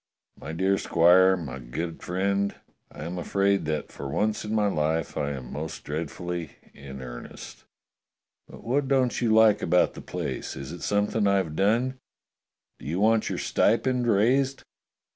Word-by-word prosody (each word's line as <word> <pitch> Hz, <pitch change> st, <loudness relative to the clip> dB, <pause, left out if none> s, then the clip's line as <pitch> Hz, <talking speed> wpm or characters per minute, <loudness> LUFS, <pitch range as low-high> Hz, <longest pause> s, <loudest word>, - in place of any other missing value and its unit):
My 75 Hz, -, -8 dB
dear 95 Hz, +4 st, +1 dB
squire, 95 Hz, +3 st, +5 dB
my 70 Hz, -6 st, -6 dB
good 80 Hz, +8 st, -5 dB
friend, 100 Hz, +2 st, -1 dB, 0.4 s
I -, -, -9 dB
am 90 Hz, +2 st, -4 dB
afraid 100 Hz, +1 st, +1 dB
that 75 Hz, -1 st, -3 dB
for 70 Hz, -, -7 dB
once 105 Hz, +9 st, 0 dB
in 105 Hz, +1 st, -3 dB
my 105 Hz, -1 st, +2 dB
life 80 Hz, -4 st, 0 dB
I 70 Hz, -, -1 dB
am 65 Hz, -2 st, -8 dB
most 75 Hz, +3 st, -6 dB
dreadfully 80 Hz, +1 st, -5 dB, 0.2 s
in 65 Hz, -1 st, -9 dB
earnest." -, -, -10 dB, 0.8 s
"But -, -, -13 dB
what 135 Hz, +4 st, 0 dB
don't 130 Hz, -3 st, +1 dB
you 115 Hz, -2 st, +2 dB
like 110 Hz, -1 st, +5 dB
about 90 Hz, -, +3 dB
the -, -, -9 dB
place? -, -, -5 dB
Is 70 Hz, +2 st, -7 dB
it 85 Hz, -, -8 dB
something 105 Hz, +1 st, +1 dB
I've 95 Hz, -6 st, +1 dB
done? 120 Hz, +8 st, +1 dB, 0.8 s
Do 60 Hz, -, -10 dB
you 85 Hz, +5 st, -1 dB
want 110 Hz, +1 st, +3 dB
your -, -, -3 dB
stipend 125 Hz, +2 st, +1 dB
raised? 130 Hz, +6 st, +2 dB
95 Hz, 160 wpm, -26 LUFS, 80-110 Hz, 0.8 s, squire